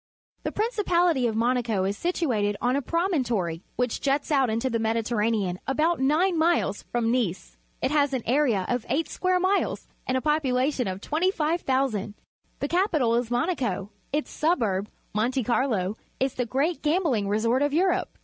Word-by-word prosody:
— - - -47
The - - -1
principality 355 - +1
of 220 - -2
Monaco 230 -3 +1
is 200 +1 -1
situated 230 - 0
on 250 +1 +1
a 280 - +1
promontory, 250 - -1
which 245 -1 -1
juts 280 +2 0
out 270 -4 +3
into 230 +4 0
the 230 -3 0
^Mediterranean 220 -4 0
about 315 +5 +1
nine 320 +6 +2
miles 320 - +2
from 235 -1 +1
Nice. 225 -8 -1 0.3
It 260 - +1
has 290 -2 +3
an 260 -4 -2
area 240 -7 +2
of 245 -2 -1
eight 305 +6 +1
square 370 0 0
miles 380 +2 0 0.2
and 255 - +1
a - - -1
population 270 -4 +1
of 190 +1 -4
25,000. 295 - 0 0.5
The 285 - 0
capital 315 - +2
is 235 0 0
Monaco. 240 - -1 0.2
Its 295 +2 -2
suburb, 220 - 0 0.2
Monte 240 +5 0
Carlo, 220 -5 0 0.2
is 265 0 0
the 250 -1 -2
great 285 +8 0
gambling 300 - +1
resort 230 +5 +1
of 290 0 +2
Europe. 355 +4 +1
255 Hz, 160 wpm, -26 LUFS, 225-310 Hz, 0.5 s, out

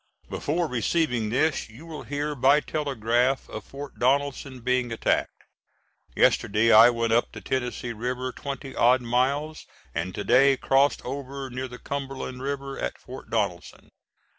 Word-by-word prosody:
Before 170 +4 -1
receiving 125 -2 0
this 135 +2 0
you 120 +9 -13
will 160 -2 -7
hear 145 +1 -3
by 140 +2 +4
telegraph 130 -4 0
of - - -7
Fort 140 +1 -9
Donelson 135 0 0
being 125 0 0
attacked. 115 - -1 0.7
Yesterday 110 +3 +3
I 110 +2 +9
went 115 -1 0
up 120 - +2
the - - -8
Tennessee 125 -2 -3
River 125 +3 -3
twenty 135 0 -7
odd 125 +2 +4
miles, 140 +6 0 0.3
and 85 +3 -3
to 105 - -3
day 135 +4 +5
crossed 135 +2 +2
over 135 0 -5
near 130 +2 -4
the 125 0 -10
Cumberland 135 -2 -5
River 140 0 -4
at - - -3
Fort 130 +1 -11
Donelson. 100 -6 -3
130 Hz, 145 wpm, -26 LUFS, 120-140 Hz, 0.7 s, I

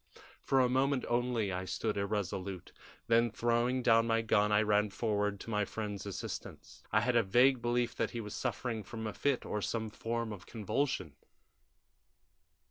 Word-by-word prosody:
"For 135 - +2
a 125 - +4
moment 130 +1 +1
only 120 -4 0
I 90 +1 -3
stood 110 +3 -2
irresolute, 100 -2 -3 0.3
then, 115 +1 +4
throwing 120 +3 +1
down 115 -1 +5
my 115 0 +2
gun, 105 -1 +3
I 105 +1 +4
ran 105 0 +2
forward 105 -1 -1
to 115 - -7
my 105 -1 +1
friend's 105 -1 -5
assistance. 95 -2 -7
I 110 - +4
had 120 +1 +1
a 115 - +6
vague 120 +5 +4
belief 120 0 0
that - - 0
he 120 - -5
was 105 -2 -6
suffering 115 -3 -2
from 110 -1 -7
a 110 - -3
fit 140 -3 0
or 105 - -2
some 110 +1 -2
form 115 0 -3
of 95 -3 -11
convulsion. 120 +6 -2
115 Hz, 170 wpm, -33 LUFS, 105-120 Hz, 0.3 s, a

